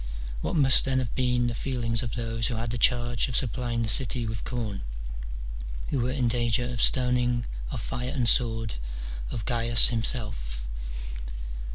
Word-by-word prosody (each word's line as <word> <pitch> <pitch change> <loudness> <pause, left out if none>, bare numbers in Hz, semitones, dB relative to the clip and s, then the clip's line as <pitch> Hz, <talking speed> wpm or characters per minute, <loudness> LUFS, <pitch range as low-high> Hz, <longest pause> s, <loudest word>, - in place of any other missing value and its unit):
What - - -2
must 135 -4 +6
then 135 -1 0
have 125 -3 -2
been 125 -1 +1
the 120 - -1
feelings 115 -2 -1
of 115 -4 -5
those 115 -1 -1
who 120 - -3
had 115 0 -3
the 120 - -3
charge 120 0 +2
of 125 - -4
supplying 120 -1 0
the - - -1
city 125 +1 +2
with 110 -1 -4
corn, 110 -6 -4 1.1
who 140 - 0
were 120 +1 0
in 130 -2 0
danger 120 0 +1
of 120 -1 -3
stoning, 125 -1 +2 0.2
of - - -4
fire 125 +1 -4
and 130 -4 -1
sword, 115 -2 +2 0.6
of 110 - -5
Gains 120 -1 +7
himself 105 - -2
120 Hz, 165 wpm, -27 LUFS, 115-125 Hz, 1.1 s, Gains